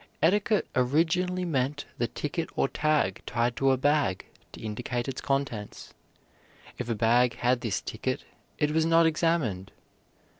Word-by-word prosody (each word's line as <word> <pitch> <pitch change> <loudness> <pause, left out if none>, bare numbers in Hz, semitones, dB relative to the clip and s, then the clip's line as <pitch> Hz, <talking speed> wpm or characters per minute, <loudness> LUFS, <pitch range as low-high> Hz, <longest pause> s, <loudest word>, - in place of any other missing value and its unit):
Etiquette 205 +4 +3
originally 170 +8 +1
meant 145 -2 -1
the 120 - +1
ticket 160 +6 -3
or - - +2
tag 150 -11 0
tied 120 0 0
to 135 - +2
a 130 - +3
bag 140 -8 +1 0.3
to - - -11
indicate 115 +3 -3
its 135 - -4
contents. 135 -7 -3 0.9
If 125 -1 -4
a 115 - 0
bag 120 +2 +3
had 125 0 +1
this 115 -5 -1
ticket - - -3 0.3
it 150 0 +1
was 160 +1 +2
not 165 0 +5
examined. 155 - 0
135 Hz, 145 wpm, -28 LUFS, 120-160 Hz, 0.9 s, not